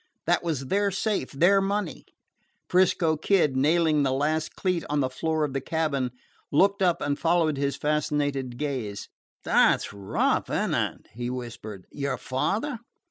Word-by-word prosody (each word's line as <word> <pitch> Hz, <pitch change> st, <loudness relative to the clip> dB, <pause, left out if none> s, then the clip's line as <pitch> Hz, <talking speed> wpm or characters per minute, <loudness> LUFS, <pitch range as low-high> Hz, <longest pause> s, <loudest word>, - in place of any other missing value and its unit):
That 175 Hz, +1 st, +2 dB
was 155 Hz, -6 st, -2 dB
their 200 Hz, +7 st, +1 dB
safe, 195 Hz, -, -1 dB
their 180 Hz, +8 st, +4 dB
money! 200 Hz, -2 st, -2 dB, 0.6 s
'Frisco 175 Hz, -3 st, +3 dB
Kid, 155 Hz, -4 st, +2 dB
nailing 155 Hz, +2 st, +3 dB
the 135 Hz, -2 st, +1 dB
last 155 Hz, +4 st, -1 dB
cleat 180 Hz, -3 st, 0 dB
on 150 Hz, 0 st, +1 dB
the 130 Hz, -2 st, 0 dB
floor 160 Hz, +3 st, -1 dB
of 145 Hz, -3 st, -2 dB
the 135 Hz, -, -1 dB
cabin, 145 Hz, -5 st, -1 dB, 0.4 s
looked 195 Hz, +7 st, +3 dB
up 180 Hz, -3 st, +2 dB
and 145 Hz, 0 st, -1 dB
followed 165 Hz, -3 st, +2 dB
his 140 Hz, 0 st, 0 dB
fascinated 145 Hz, -4 st, -1 dB
gaze. 125 Hz, -9 st, -4 dB, 0.3 s
"That -, -, +4 dB
's -, -, -7 dB
rough, 100 Hz, -1 st, 0 dB
is -, -, 0 dB
n't -, -, -1 dB
it," -, -, -2 dB
he 120 Hz, +2 st, -4 dB
whispered. 115 Hz, -6 st, -7 dB
"Your 140 Hz, -2 st, -2 dB
father?" 220 Hz, -, -2 dB
150 Hz, 160 wpm, -26 LUFS, 135-175 Hz, 0.6 s, their